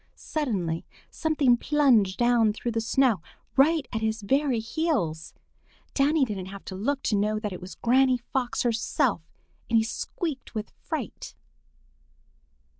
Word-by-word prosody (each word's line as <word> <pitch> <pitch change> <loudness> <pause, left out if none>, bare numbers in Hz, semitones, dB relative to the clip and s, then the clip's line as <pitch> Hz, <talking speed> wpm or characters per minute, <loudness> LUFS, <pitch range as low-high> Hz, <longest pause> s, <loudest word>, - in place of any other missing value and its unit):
Suddenly 195 - -2 0.3
something 295 -6 +2
plunged 240 -10 +3
down 240 -3 +3
through 235 +2 -3
the 225 0 -1
snow 225 -4 +2 0.3
right 290 +1 +4
at 220 - -1
his 220 -1 -1
very 270 +3 +2
heels. 225 - -2 0.6
Danny 285 +1 +3
didn't 195 -5 -5
have 195 +1 -9
to 190 - -6
look 270 +9 -1
to 215 - +1
know 210 +1 +1
that 210 -2 -3
it 180 - -8
was 185 +1 -9
Granny 255 +1 +3
Fox 245 +1 -2
herself, 225 -7 +1 0.5
and 230 - +4
he 220 - +4
squeaked 270 - -4
with 215 -1 -4
fright. - - -6
235 Hz, 140 wpm, -26 LUFS, 210-275 Hz, 0.6 s, right